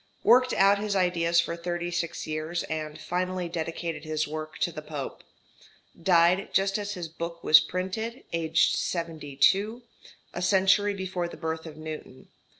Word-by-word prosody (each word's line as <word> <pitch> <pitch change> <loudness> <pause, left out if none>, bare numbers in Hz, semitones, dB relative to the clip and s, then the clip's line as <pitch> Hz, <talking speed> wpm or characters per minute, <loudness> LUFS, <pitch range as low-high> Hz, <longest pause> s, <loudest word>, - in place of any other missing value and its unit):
Worked 255 +2 +5
out 200 +1 +4
his 205 -1 -2
ideas 170 -2 +2
for 170 - 0
36 175 0 -3
years, 155 +3 -3
and 155 -1 -5
finally 180 0 -2
dedicated 165 0 -4
his 155 -1 -1
work 155 +1 -6
to 175 - +1
the 155 - -7
Pope. 150 -3 -6 0.8
Died 175 +2 +4
just 195 +1 +2
as 205 0 -4
his 175 -2 -5
book 170 +1 -6
was 155 - +8
printed, 220 - -4
aged 165 -1 +2
72, 170 - 0 0.5
a 175 - -4
century 195 +2 +3
before 185 -2 -3
the - - -10
birth 160 0 -4
of 155 -1 -10
Newton. 155 -4 -8
170 Hz, 150 wpm, -27 LUFS, 160-190 Hz, 0.8 s, was